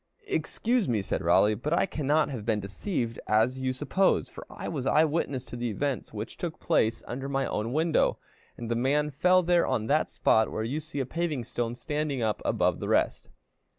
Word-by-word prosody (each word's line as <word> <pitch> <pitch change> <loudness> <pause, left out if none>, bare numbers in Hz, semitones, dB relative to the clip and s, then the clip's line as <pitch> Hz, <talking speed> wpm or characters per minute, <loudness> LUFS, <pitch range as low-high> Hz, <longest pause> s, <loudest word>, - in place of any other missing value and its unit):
"Excuse 235 - 0
me," 110 -4 +1
said - - -2
Raleigh, 105 +1 +4
"but 135 +9 -2
I - - +3
cannot 150 -3 +1
have 125 -7 -5
been 110 -1 0
deceived 115 - -3
as 115 +5 +2
you 130 0 0
suppose, 145 +9 +1
for - - -11
I - - -7
was 135 -5 -3
eye 155 +3 +5
witness 145 -5 -2
to - - -9
the 120 0 -2
events 135 +5 -2
which 110 0 -6
took 170 -3 -5
place 115 -9 +1
under 135 +3 -4
my 135 0 0
own 110 +3 -2
window, 160 +3 +2 0.4
and 120 - -6
the - - +2
man 145 +5 +1
fell 180 +6 +4
there 175 0 +3
on 110 - 0
that - - +2
spot 110 0 +2
where 110 - -2
you 130 +7 -2
see 155 -2 -5
a - - -2
paving 155 -2 -2
stone 120 +1 -3
standing 150 +2 -2
up 110 -2 -1
above - - +1
the - - -4
rest." - - +1
135 Hz, 205 wpm, -28 LUFS, 115-155 Hz, 0.4 s, eye